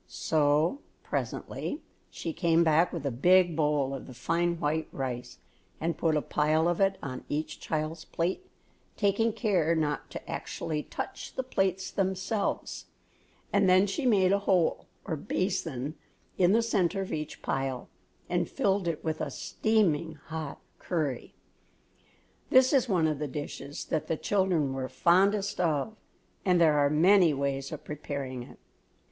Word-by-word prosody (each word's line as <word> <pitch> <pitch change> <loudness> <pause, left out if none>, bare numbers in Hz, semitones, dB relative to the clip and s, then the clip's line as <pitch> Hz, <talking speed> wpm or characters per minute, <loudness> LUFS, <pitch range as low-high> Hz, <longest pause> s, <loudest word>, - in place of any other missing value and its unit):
So, 155 - +1 0.2
presently, 295 - -4 0.3
she 165 - -5
came 170 -1 +3
back 165 +2 +3
with 165 -5 -5
a 140 - 0
big 175 +7 +4
bowl 150 -3 +1
of 135 - -6
the 130 - -10
fine 170 +6 0
white 155 +1 0
rice 125 -2 -5 0.4
and 165 0 -1
put 160 -1 +1
a 150 - -1
pile 155 +2 +2
of 175 +2 0
it 195 0 +3
on 130 -2 -5
each 155 +2 -3
child's 155 +1 -3
plate, 175 - -2 0.5
taking 210 +2 +2
care 180 -8 +1
not 150 -2 -1
to - - -8
actually 155 -2 -3
touch - - -6
the 260 - -1
plates 190 -6 -1
themselves, 190 +2 -2 0.7
and 200 -2 +4
then 185 +2 +6
she 205 +7 -1
made 190 -5 +4
a 200 - +3
hole, 185 -4 +1 0.2
or 160 - -2
basin, 155 -4 -2 0.4
in 180 0 +4
the 230 +1 +4
centre 195 -4 +1
of 190 - -6
each 155 -1 -5
pile 135 -2 -2 0.4
and - - 0
filled 195 -2 +1
it 165 -2 -2
with 160 -1 -2
a - - -1
steaming 170 -8 0
hot 155 0 -6 0.2
curry. 150 -8 -3 1.1
This 260 +2 +5
is 260 -3 +3
one 175 -5 +3
of 155 -2 -1
the 150 - -2
dishes 145 +1 -6
that 155 0 -2
the 160 - -1
children 180 -9 +1
were 130 -1 -3
fondest 195 +9 +2
of 165 +5 0 0.5
and 180 -2 +3
there 155 -3 +5
are 145 0 +4
many 170 +1 +5
ways 140 0 -2
of - - -7
preparing 140 -3 -5
it. 120 - -12
165 Hz, 155 wpm, -29 LUFS, 150-190 Hz, 1.1 s, then